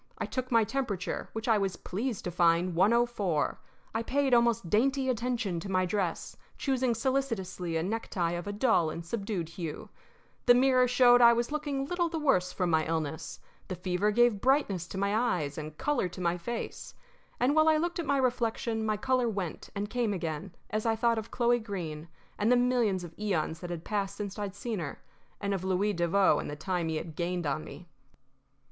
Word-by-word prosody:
I -, -, -2 dB
took 255 Hz, -1 st, -4 dB
my 230 Hz, -1 st, +5 dB
temperature, 210 Hz, -6 st, -3 dB
which 220 Hz, +1 st, -4 dB
I 220 Hz, -3 st, +4 dB
was 195 Hz, -2 st, -1 dB
pleased 225 Hz, +3 st, -4 dB
to 180 Hz, -, -3 dB
find 170 Hz, +1 st, +3 dB
104. 205 Hz, -4 st, +2 dB, 0.3 s
I 225 Hz, -, 0 dB
paid 270 Hz, +2 st, +1 dB
almost 235 Hz, -5 st, +3 dB
dainty 265 Hz, +7 st, +2 dB
attention 235 Hz, -7 st, -1 dB
to 195 Hz, -, -7 dB
my 185 Hz, -1 st, +2 dB
dress, 180 Hz, -2 st, -2 dB, 0.2 s
choosing 260 Hz, -3 st, +1 dB
solicitously 225 Hz, -9 st, -1 dB
a 160 Hz, -, -1 dB
necktie 185 Hz, -4 st, -1 dB
of 175 Hz, +2 st, -4 dB
a -, -, -2 dB
dull 205 Hz, -6 st, +2 dB
and 165 Hz, +2 st, -6 dB
subdued 195 Hz, -3 st, -3 dB
hue. 165 Hz, -3 st, -6 dB, 0.6 s
The 245 Hz, -, +8 dB
mirror 255 Hz, 0 st, +4 dB
showed 245 Hz, 0 st, +6 dB
that 235 Hz, -, +9 dB
I 235 Hz, -, +7 dB
was 235 Hz, +3 st, -1 dB
looking 290 Hz, -3 st, -2 dB
little 345 Hz, +2 st, 0 dB
the 330 Hz, -, -3 dB
worse 185 Hz, -, +2 dB
from 180 Hz, -2 st, -1 dB
my 160 Hz, 0 st, +3 dB
illness. 160 Hz, -1 st, -3 dB, 0.3 s
The 185 Hz, -, -4 dB
fever 180 Hz, +3 st, 0 dB
gave 230 Hz, -1 st, +3 dB
brightness 230 Hz, -, +2 dB
to 190 Hz, -, -7 dB
my 200 Hz, +2 st, +1 dB
eyes 180 Hz, -, 0 dB
and 155 Hz, 0 st, -7 dB
color 285 Hz, -11 st, 0 dB
to 180 Hz, -, -10 dB
my 175 Hz, -1 st, +1 dB
face. 225 Hz, +7 st, -6 dB, 0.4 s
And 265 Hz, +4 st, +2 dB
while 310 Hz, 0 st, +5 dB
I 310 Hz, -, +4 dB
looked 345 Hz, +2 st, -1 dB
at 330 Hz, -, -3 dB
my 280 Hz, 0 st, +2 dB
reflection 235 Hz, -3 st, 0 dB
my 215 Hz, -1 st, 0 dB
color 255 Hz, +1 st, +1 dB
went 195 Hz, -6 st, -4 dB
and 200 Hz, +1 st, -2 dB
came 235 Hz, -2 st, 0 dB
again 170 Hz, 0 st, -4 dB, 0.2 s
as 215 Hz, 0 st, -1 dB
I 225 Hz, -1 st, +2 dB
thought 230 Hz, 0 st, +2 dB
of 220 Hz, -, -8 dB
Chloe 240 Hz, 0 st, +2 dB
Greene 170 Hz, -8 st, -5 dB, 0.3 s
and 215 Hz, +3 st, +3 dB
the -, -, +6 dB
millions 240 Hz, -7 st, +2 dB
of 170 Hz, -1 st, -9 dB
eons 170 Hz, -6 st, -1 dB
that 175 Hz, -, -7 dB
had 170 Hz, -2 st, -5 dB
passed 200 Hz, -2 st, -2 dB
since 205 Hz, 0 st, -5 dB
I'd 200 Hz, -2 st, -4 dB
seen 220 Hz, 0 st, -3 dB
her, 150 Hz, -4 st, -6 dB, 0.4 s
and 200 Hz, -1 st, -1 dB
of 190 Hz, -2 st, -2 dB
Louis 190 Hz, +2 st, +1 dB
Devoe 175 Hz, +3 st, +3 dB
and -, -, -4 dB
the 145 Hz, -, -4 dB
time 175 Hz, +1 st, -2 dB
he 160 Hz, -, -1 dB
had 155 Hz, 0 st, -5 dB
gained 175 Hz, 0 st, -2 dB
on 145 Hz, +2 st, -1 dB
me. 175 Hz, -, -11 dB
205 Hz, 205 wpm, -30 LUFS, 175-245 Hz, 0.6 s, that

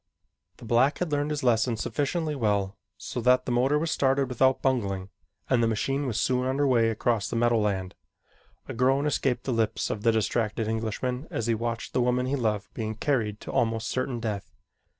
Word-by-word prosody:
The -, -, -12 dB
black 120 Hz, +5 st, +3 dB
had 180 Hz, -3 st, -2 dB
learned 145 Hz, 0 st, 0 dB
his 150 Hz, -2 st, -2 dB
lesson 115 Hz, -1 st, +2 dB
sufficiently 150 Hz, +6 st, -1 dB
well 105 Hz, -6 st, 0 dB, 0.2 s
so 125 Hz, -, -5 dB
that 125 Hz, +1 st, +4 dB
the -, -, -2 dB
motor 130 Hz, +5 st, +2 dB
was 160 Hz, +1 st, -1 dB
started 135 Hz, -1 st, +1 dB
without 130 Hz, +1 st, +3 dB
bungling 100 Hz, -8 st, -1 dB, 0.4 s
and 125 Hz, -3 st, +2 dB
the 115 Hz, -, +3 dB
machine 135 Hz, +6 st, -1 dB
was 110 Hz, -4 st, -1 dB
soon 125 Hz, 0 st, +1 dB
under 135 Hz, +2 st, +1 dB
way 120 Hz, -4 st, +3 dB
across 110 Hz, -2 st, 0 dB
the -, -, -4 dB
meadowland. 105 Hz, -6 st, +1 dB, 0.7 s
A -, -, -5 dB
groan 135 Hz, +4 st, +2 dB
escaped 130 Hz, -4 st, 0 dB
the 130 Hz, -, -1 dB
lips 115 Hz, -2 st, 0 dB
of 105 Hz, -, -4 dB
the 115 Hz, -, +4 dB
distracted 110 Hz, 0 st, 0 dB
Englishman 115 Hz, +5 st, -2 dB
as 115 Hz, -, -3 dB
he 115 Hz, -, +2 dB
watched 115 Hz, 0 st, -3 dB
the 125 Hz, -, +2 dB
woman 125 Hz, +1 st, +1 dB
he 135 Hz, +2 st, 0 dB
loved 110 Hz, -5 st, -2 dB
being 110 Hz, -1 st, -4 dB
carried 110 Hz, -5 st, -1 dB
to -, -, -7 dB
almost 115 Hz, -1 st, 0 dB
certain 130 Hz, -1 st, -2 dB
death. 105 Hz, -4 st, -4 dB
120 Hz, 190 wpm, -27 LUFS, 110-130 Hz, 0.7 s, that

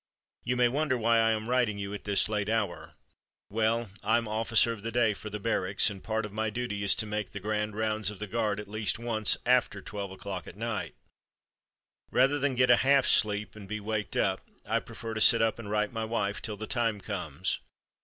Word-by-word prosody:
You 125 Hz, +2 st, 0 dB
may 125 Hz, 0 st, +5 dB
wonder 135 Hz, +1 st, 0 dB
why 115 Hz, 0 st, +3 dB
I 115 Hz, 0 st, +4 dB
am 110 Hz, 0 st, -1 dB
writing 120 Hz, -4 st, +1 dB
you 100 Hz, 0 st, -5 dB
at 105 Hz, -, -7 dB
this 100 Hz, -1 st, +2 dB
late 105 Hz, -1 st, -1 dB
hour. 105 Hz, -6 st, -2 dB, 0.6 s
Well, 110 Hz, 0 st, 0 dB
I'm 110 Hz, +2 st, +1 dB
'officer 110 Hz, +1 st, +2 dB
of 110 Hz, -, -10 dB
the 115 Hz, +2 st, -4 dB
day' 115 Hz, -2 st, +2 dB
for 110 Hz, -, -8 dB
the 105 Hz, 0 st, -5 dB
Barracks, 100 Hz, -2 st, +1 dB
and 100 Hz, -, -8 dB
a -, -, -22 dB
part 110 Hz, 0 st, -2 dB
of 105 Hz, -, -9 dB
my 110 Hz, 0 st, -1 dB
duty 105 Hz, -2 st, -3 dB
is 100 Hz, -, +3 dB
to -, -, 0 dB
make 105 Hz, 0 st, -3 dB
'the 105 Hz, -, -7 dB
grand 105 Hz, +1 st, -2 dB
rounds' 110 Hz, -2 st, -1 dB
of 105 Hz, -, -7 dB
the 105 Hz, -, -5 dB
guards 105 Hz, -1 st, -1 dB
at 105 Hz, -, -7 dB
least 110 Hz, +2 st, -1 dB
once 110 Hz, -2 st, +1 dB
after 125 Hz, 0 st, +2 dB
twelve 100 Hz, -2 st, -6 dB
o'clock 95 Hz, -1 st, -6 dB
at -, -, -11 dB
night. 115 Hz, -1 st, -3 dB, 1.1 s
Rather 135 Hz, +3 st, +3 dB
than 140 Hz, -1 st, +1 dB
get 125 Hz, 0 st, +4 dB
a 120 Hz, -, +7 dB
half 135 Hz, -1 st, +4 dB
sleep 105 Hz, -1 st, +2 dB
and 100 Hz, -2 st, -10 dB
be 110 Hz, 0 st, -3 dB
waked 105 Hz, 0 st, -3 dB
up, -, -, +1 dB, 0.2 s
I -, -, +1 dB
prefer 115 Hz, -1 st, -7 dB
to 110 Hz, -, -1 dB
sit 115 Hz, -, +9 dB
up 115 Hz, 0 st, +1 dB
and 105 Hz, -3 st, -7 dB
write 105 Hz, +1 st, 0 dB
my 115 Hz, -1 st, -2 dB
wife 105 Hz, -3 st, -2 dB
till 105 Hz, -2 st, -5 dB
the 110 Hz, -, -5 dB
time 115 Hz, -3 st, -1 dB
comes. 90 Hz, -5 st, -3 dB
110 Hz, 225 wpm, -29 LUFS, 105-115 Hz, 1.1 s, sit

